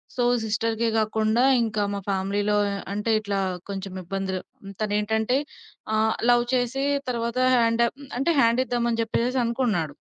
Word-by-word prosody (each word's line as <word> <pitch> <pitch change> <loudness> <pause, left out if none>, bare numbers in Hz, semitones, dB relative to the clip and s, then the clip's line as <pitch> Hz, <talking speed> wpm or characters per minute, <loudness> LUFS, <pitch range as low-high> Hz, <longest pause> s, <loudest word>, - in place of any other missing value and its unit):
So, 245 - 0 0.2
సిస్టర్‌కే 225 +1 0
కాకుండా 220 +2 +1 0.2
ఇంకా 215 -2 -1
మా 200 - -2
ఫ్యామిలీలో 200 +2 0 0.4
అంటే 210 +3 -2
ఇట్లా 200 -2 -2 0.3
కొంచెం 195 -1 -5
ఇబ్బందులు 190 +1 -3 0.4
తనేంటంటే 215 +3 +1 0.6
ఆహ్, 220 0 +2 0.2
లవ్ 240 0 +3
చేసి 250 +2 0 0.3
తర్వాత 235 0 -2 0.2
హ్యాండ 230 0 +2 0.4
అంటే 305 +6 +2
హ్యాండిద్దామని 235 0 +1
జెప్పేసేసి 235 +3 0
అనుకున్నాడు. 230 - -1
220 Hz, 120 wpm, -25 LUFS, 205-235 Hz, 0.6 s, లవ్